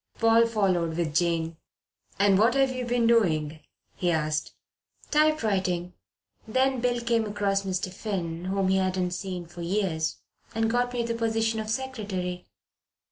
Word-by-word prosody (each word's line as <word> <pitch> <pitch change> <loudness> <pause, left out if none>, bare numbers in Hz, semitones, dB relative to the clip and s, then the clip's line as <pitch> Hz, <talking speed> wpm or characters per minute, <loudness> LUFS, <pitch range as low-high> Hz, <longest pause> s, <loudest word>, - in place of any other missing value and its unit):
Paul 230 0 +5
followed 185 -7 0
with 165 -3 -1
Jane. 165 -1 +1 0.6
"And 195 -1 +4
what 230 +4 +4
have 270 -1 +3
you 255 -1 -3
been 240 -1 +1
doing?" 160 -10 +2 0.3
he 180 - -1
asked. 155 -2 -1 0.6
"Typewriting. 200 - +1 0.5
Then 260 +2 +1
Bill 245 -1 +1
came 235 -1 +1
across 200 -1 0
Mr. 185 -1 -3
Finn, 180 -5 -4
whom 190 0 0
he 190 - +3
hadn't 185 -1 0
seen 180 -1 -4
for 175 +1 -10
years, 170 -3 -1 0.4
and 225 0 +1
got 245 +1 +1
me 245 -1 -1
the 230 0 -2
position 225 -1 0
of 215 0 -4
secretary. 205 -8 -3
195 Hz, 145 wpm, -27 LUFS, 180-230 Hz, 0.6 s, Paul